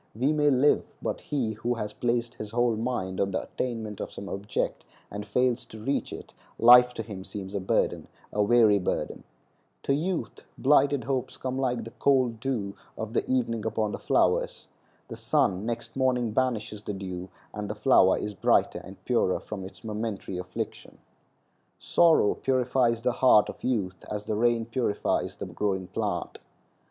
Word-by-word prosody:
We 130 +7 +2
may 150 -1 +3
live, 140 +2 +4 0.2
but - - -3
he 130 -7 -1
who 120 +3 -2
has 105 -2 -4
placed 120 +1 -1
his 105 -3 -7
whole 120 0 +1
mind 110 -5 -2
on 100 - +1
the 95 - -2
attainment 110 -4 -4
of - - -5
some 100 - -8
object 100 +2 -3 0.3
and 105 +1 -5
fails 125 +3 +1
to 110 - -11
reach 135 +6 -1
it, - - -9 0.2
life 125 +1 +8
to - - -3
him 100 -4 -8
seems 95 -1 -7
a 100 - -1
burden—a 95 +2 -1
weary 105 -1 +5
burden. 90 - -3 0.6
To 140 - +1
youth 170 +5 -2
blighted 140 -1 +3
hopes 130 0 -2
come 130 0 -3
like 125 -3 0
the 115 - -9
cold 130 -4 +2
dew 110 -6 -2 0.2
of 110 +2 -5
evening 115 -4 0
upon 110 -1 -1
the - - -5
flowers. - - +1 0.4
The - - -7
sun 95 +3 +1
next 120 0 -4
morning 125 -3 +1
banishes 110 -3 -1
the 105 - -4
dew, 95 -1 -6 0.2
and 105 -1 -5
the 105 - -3
flower 105 -5 +5
is 105 - -4
brighter 95 - +2
and - - -13
purer - - +2
from 100 -3 -7
its 95 0 -11
momentary 105 -4 -4
affliction. 90 0 -6 0.8
Sorrow 165 -11 +4
purifies 125 -3 +1
the 125 - +2
heart 120 -4 +5
of - - -9
youth 100 -8 -1
as 105 -1 -4
the - - -2
rain 115 +1 +2
purifies 115 -3 -1
the - - -6
growing 95 -3 -2
plant. - - -3
115 Hz, 165 wpm, -27 LUFS, 105-125 Hz, 0.8 s, life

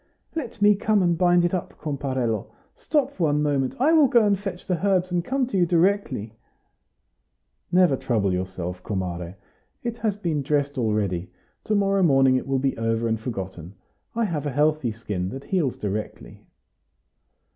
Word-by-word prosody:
"Let 245 -9 -4
me 210 0 +7
come 205 0 +1
and 175 -1 +2
bind 175 0 +4
it 175 - -1
up, 180 - -3
comparello. 130 -6 -2 0.3
Stop 285 -5 -1
one 150 -3 +2
moment; 140 -3 0
I 300 +6 +4
will 310 -4 +6
go 235 -4 +4
and 205 -1 +3
fetch 195 -2 -6
the 180 -2 -2
herbs, 185 -2 +2
and 175 -1 0
come 265 +5 0
to 240 -5 -3
you 175 - +3
directly." 170 - +1 1.4
"Never 180 -5 +4
trouble 105 -7 0
yourself, 90 -1 -4
comare. 90 -3 -4 0.5
It 235 -1 -4
has 215 -3 0
been 170 -7 -2
dressed 145 0 0
already; 100 -6 -1 0.4
to 215 - +1
morrow 195 -1 +2
morning 135 -6 +5
it 130 - -2
will 135 0 +1
be 135 0 0
all 115 - -2
over 115 0 +1
and 110 -1 0
forgotten. 95 -6 -6 0.4
I 230 0 +1
have 155 -7 -2
a - - -2
healthy 150 -1 +1
skin, 105 -5 -4
that 135 +6 -7
heals 155 -6 -1
directly." 105 +1 -6
150 Hz, 170 wpm, -24 LUFS, -, 1.4 s, me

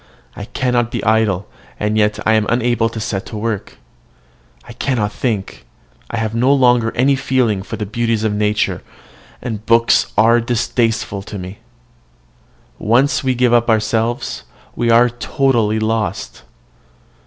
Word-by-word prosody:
I 100 - -7
cannot 125 -1 0
be - - -4
idle, 110 -3 +1 0.3
and 105 0 0
yet 105 -1 +2
I 110 - +4
am 110 -1 +2
unable 120 -1 +1
to 115 - -7
set 100 -3 -3
to 110 - -7
work. 105 -2 -4 0.9
I 120 - -9
cannot 115 -4 -1
think: 110 -6 -3 0.5
I 115 - -4
have 110 -1 -2
no 125 +4 +2
longer 125 -4 +3
any 135 +3 +3
feeling 125 -7 0
for - - -6
the 105 - -4
beauties 115 +1 -1
of 110 -2 0
nature, 105 0 0 0.6
and 110 -4 -4
books 115 +1 +3
are 115 +3 +5
distasteful 115 -3 -1
to 100 +1 -8
me. 95 +2 -8 1.2
Once 125 +7 +2
we 130 -1 +1
give 125 -1 +2
ourselves 115 - +1 0.2
up, - - -31
we 120 - 0
are 115 +1 +6
totally 120 -2 0
lost. 110 0 -2
115 Hz, 145 wpm, -17 LUFS, 105-120 Hz, 1.2 s, are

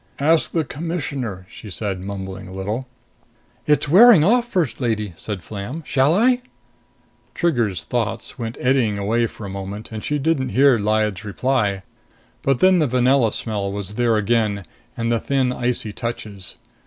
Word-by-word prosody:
"Ask 155 +3 +2
the 165 - +1
Commissioner," 145 - -4
she 105 - -11
said, 95 -1 -4
mumbling 95 -1 -6
a - - -10
little. 105 +7 -4 0.8
"It's 150 0 +3
wearing 195 - +8
off, 240 +6 +3
First 160 - -1
Lady," 105 -5 -1
said 100 0 -6
Flam. 110 - -6
"Shall 135 +5 +3
I?" 245 +4 +3 0.9
Trigger's 120 - 0
thoughts 115 +1 -3
went 115 0 -4
eddying 125 -5 +2
away 115 +4 +1
for 110 - -10
a - - -6
moment, 100 +3 -6
and 110 -1 -6
she 150 - 0
didn't 140 -3 0
hear 135 -1 +4
Lyad's 105 -1 0
reply. 105 -3 0 0.6
But 135 -2 +1
then 185 -1 +5
the 155 - +2
vanilla 125 -1 +3
smell 105 -4 -2
was 100 0 -5
there 115 0 +2
again, 105 -2 +1 0.3
and 115 0 -1
the 115 - +2
thin 135 -1 0
icy 120 -4 -2
touches. 105 -5 -6
115 Hz, 155 wpm, -21 LUFS, 100-140 Hz, 0.9 s, wearing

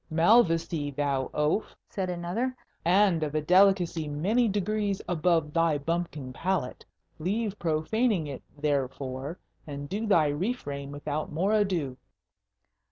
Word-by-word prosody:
"Malvoisie, 165 -4 +3
thou 140 -2 -1
oaf?" 150 +8 0
said 190 -2 -3
another; 180 +9 -2 0.3
"and 180 -1 +4
of 155 -1 -2
a 155 - +2
delicacy 180 -2 +4
many 195 +12 +1
degrees 205 0 -1
above 165 -3 +1
thy 165 -2 +3
bumpkin 150 -3 -3
palate. 180 -4 -2 0.4
Leave 205 +4 -2
profaning 175 +4 +1
it, 140 -3 -6 0.2
therefore, 140 +1 -2 0.3
and 145 -1 -6
to 215 +3 -2
thy 170 -7 +5
refrain 145 - -2
without 145 +1 -4
more 185 +7 +1
ado." 180 -11 0
165 Hz, 120 wpm, -28 LUFS, 145-195 Hz, 0.4 s, thy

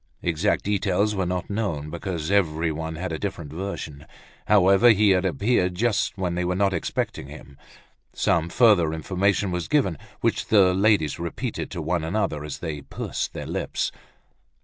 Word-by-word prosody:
Exact 85 +4 +1
details 100 +1 +1
were 95 -3 -1
not 90 0 -2
known, 85 -9 -3
because 85 -1 -4
everyone 80 -4 0
had 90 +2 -4
a 80 - -3
different 85 -7 -5
version. 80 -5 -6 0.4
However, 100 +3 +6
he 105 -2 +5
had 95 0 +2
appeared 90 - +1
just 105 -1 0
when 90 -2 -1
they 90 +1 -1
were 90 +1 -1
not 100 0 +2
expecting 85 - -3
him. 70 - -12 0.6
Some 85 0 +1
further 95 -7 +4
information 95 +4 0
was 90 -1 -3
given, 125 - +1 0.2
which - - 0
the 95 -4 +5
ladies 95 -7 +2
repeated 105 +8 -4
to 85 -4 -5
one 85 +1 -1
another 80 -4 -1
as 75 -2 -5
they 75 -4 -5
pursed - - -4
their - - -6
lips. - - -2
90 Hz, 160 wpm, -24 LUFS, 80-100 Hz, 0.6 s, However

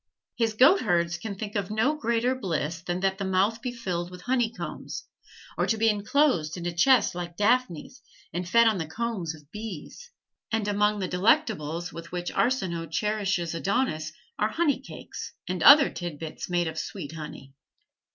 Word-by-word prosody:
His 225 -2 +1
goatherds 205 - +4
can 200 +1 -5
think 210 +1 -6
of 200 -2 -1
no 220 +8 +2
greater 235 -2 +1
bliss 170 - -3
than 175 +1 -3
that 190 0 0
the - - -1
mouth 195 +4 +1
be 250 - -3
filled 180 -7 -3
with 180 0 -11
honey 245 +1 +1
combs, 235 - -6 0.6
or - - +2
to 225 - +1
be 225 +1 +4
inclosed 205 - +1
in 175 - -6
a 175 - -2
chest 235 +6 +4
like 175 -1 -6
Daphnis 245 - 0 0.3
and 175 +1 -3
fed 235 +3 +6
on 215 -4 +2
the 160 - -3
combs 190 -3 -3
of 150 0 -19
bees; 215 - -8 0.4
and 220 -2 0
among 210 +1 +2
the 185 - -1
delectables 180 - +1
with 165 0 -9
which 175 0 -3
Arsinoe 180 -10 0
cherishes 195 -1 -1
Adonis 165 -3 -1 0.3
are 210 - +2
"honey 310 +3 +1
cakes," - - -9
and 180 -1 -3
other 285 - +8
tid 175 -4 -5
bits 160 +3 -6
made 175 -1 +1
of 160 0 -4
"sweet 145 - -6
honey." 150 -4 -9
195 Hz, 175 wpm, -27 LUFS, 170-230 Hz, 0.6 s, other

